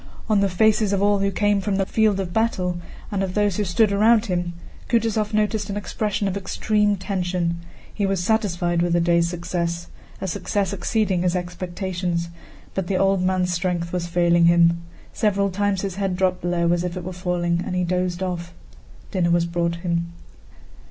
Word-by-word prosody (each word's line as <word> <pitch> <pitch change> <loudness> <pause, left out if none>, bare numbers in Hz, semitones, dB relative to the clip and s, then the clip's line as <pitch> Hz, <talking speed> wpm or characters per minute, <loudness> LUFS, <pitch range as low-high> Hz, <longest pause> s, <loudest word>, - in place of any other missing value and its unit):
On 215 -3 +3
the 200 0 +2
faces 215 +2 +3
of 200 0 +1
all 205 0 +3
who 200 0 +1
came 205 0 +1
from 200 0 -1
the 195 0 +1
field 215 -1 +2
of 180 -2 -3
battle, 185 -6 0 0.3
and 200 -2 -1
of 190 -1 -2
those 205 -2 +1
who 210 - +1
stood 200 +3 +2
around 215 +3 +4
him, 175 -3 -2 0.4
Kutúzov 225 -2 +1
noticed 215 -1 0
an 200 - -3
expression 205 0 -2
of 195 - -2
extreme 205 +1 +1
tension. 180 -3 -2 0.3
He 200 -2 0
was 195 -2 0
satisfied 175 -5 +1
with 175 0 +1
the 175 - +3
day's 170 0 +3
success—a 170 +1 -5
success 195 +2 -1
exceeding 200 -1 0
his 180 0 +1
expectations, 180 -1 -3 0.4
but 190 -2 -2
the 195 - 0
old 195 -1 +2
man's 185 -1 +1
strength 175 -1 -2
was 175 -1 -1
failing 175 0 +3
him. 170 0 +4 0.3
Several 200 -2 +1
times 200 0 0
his 195 -2 -4
head 195 -2 -1
dropped 185 -1 0
low 170 -1 +1
as 175 0 0
if 180 0 -3
it 180 - -5
were 185 +2 -5
falling 175 -1 -1
and 180 - -4
he 180 - +1
dozed 180 0 -1
off. 175 -2 -4 0.6
Dinner 180 -3 +1
was 170 0 +3
brought 170 0 -1
him. 170 -1 -1
185 Hz, 185 wpm, -23 LUFS, 175-200 Hz, 0.6 s, around